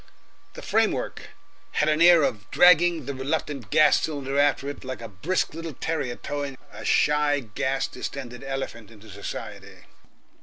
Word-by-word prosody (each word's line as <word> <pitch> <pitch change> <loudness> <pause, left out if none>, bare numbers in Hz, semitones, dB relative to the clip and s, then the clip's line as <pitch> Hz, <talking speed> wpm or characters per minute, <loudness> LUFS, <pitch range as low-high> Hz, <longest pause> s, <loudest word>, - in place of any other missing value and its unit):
The - - -9
framework - - 0 0.4
had 150 - +1
an 155 +1 +2
air 170 -2 +7
of 105 -5 -2
dragging 175 -3 +5
the 140 - -4
reluctant 135 -2 -3
gas 150 -1 +5
cylinder 140 -3 -2
after 145 -1 +2
it 145 - -6
like 130 0 -6
a 115 - -7
brisk 150 - -2
little 165 -1 -6
terrier 135 -6 -2
towing 140 -1 -5 0.2
a - - -9
shy 150 -1 +2
gas 130 +3 -2
distended 125 -2 -7
elephant 135 -5 -5
into 110 -1 -15
society. - - -8
140 Hz, 150 wpm, -25 LUFS, 130-155 Hz, 0.4 s, air